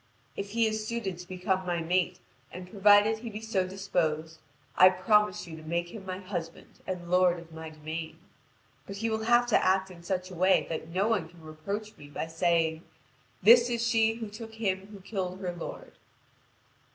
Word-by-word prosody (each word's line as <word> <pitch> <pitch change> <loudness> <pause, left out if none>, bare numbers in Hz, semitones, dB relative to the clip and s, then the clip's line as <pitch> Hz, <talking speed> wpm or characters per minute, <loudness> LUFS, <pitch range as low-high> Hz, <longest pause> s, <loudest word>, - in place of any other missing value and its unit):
If 200 0 -4
he 230 0 +3
is 215 0 -2
suited 205 -7 -3
to 180 - -9
become 185 0 -1
my 175 -2 -1
mate, 180 +2 0 0.3
and 180 +1 -8
provided 205 +3 +5
he 235 +1 -6
be 215 0 -6
so 215 -4 -1
disposed, 165 -5 -2 0.4
I 185 - +8
promise 200 +2 +2
you 165 -2 -9
to - - -10
make 170 +2 -2
him 195 -1 -10
my 185 0 -3
husband 180 -4 -7
and 175 -2 -5
lord 180 -1 +4
of 165 -1 -14
my 160 0 -7
domain. 155 +1 -6 0.7
But 195 - -6
he 225 +3 -2
will 220 0 -1
have 240 +1 +5
to - - +4
act 190 0 +2
in 170 -2 -12
such 185 +1 -3
a - - -8
way 185 +2 +3
that 160 -1 -4
no 190 +5 +1
one 200 -8 0
can 175 -1 -17
reproach 200 +8 -6
me 145 - -12
by 145 - -4
saying: 165 -1 +1 0.6
'This 235 +4 +8
is 235 -1 0
she 225 -1 +3
who 225 -1 -5
took 220 +2 -9
him 195 -3 -2
who 205 -2 -12
killed 185 -2 -4
her 180 -2 -3
lord.'" 175 - -8
185 Hz, 195 wpm, -29 LUFS, 170-210 Hz, 0.7 s, I